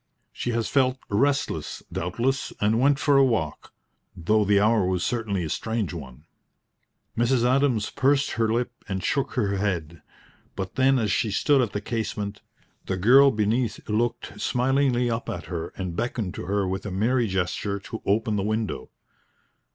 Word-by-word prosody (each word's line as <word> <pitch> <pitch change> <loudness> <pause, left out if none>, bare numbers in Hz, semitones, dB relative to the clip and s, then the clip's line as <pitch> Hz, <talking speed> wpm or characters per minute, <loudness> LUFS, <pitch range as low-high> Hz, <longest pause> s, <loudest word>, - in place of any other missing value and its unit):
"She - - -4
has 115 -1 0
felt 130 -2 +2
restless, 140 +7 0
doubtless, 120 +10 -1
and 110 +2 +2
went 140 +1 +4
for 140 0 +3
a 135 - +6
walk, 110 - -1 0.5
though 105 +5 +2
the 100 0 +3
hour 110 0 +3
was 90 -1 0
certainly 110 -6 -1
a - - -3
strange 110 +2 -2
one." 75 -2 -9 0.9
Mrs. 120 +1 +2
Adams 125 -4 +2
pursed 140 +1 +2
her 115 -1 0
lip 120 +1 0 0.2
and 95 -2 -3
shook 140 - 0
her 100 -5 0
head. 85 -5 -2 0.5
But 95 -1 -4
then 135 0 +3
as 110 -4 0
she 115 - +1
stood 135 +7 +3
at 115 -5 -1
the 105 - -2
casement, 105 -2 -4 0.5
the 95 - -1
girl 130 +9 +7
beneath 110 0 -1
looked 120 +2 -2
smilingly 125 -1 +1
up 115 0 -2
at 85 - -5
her 85 -3 -4
and 90 -3 -4
beckoned 110 -3 -2
to - - -6
her 100 0 0
with 95 +1 -3
a - - -5
merry 115 +5 +1
gesture 95 +1 -1
to 110 - -7
open 110 +1 +1
the - - 0
window. 110 +1 -2
110 Hz, 165 wpm, -25 LUFS, 100-125 Hz, 0.9 s, girl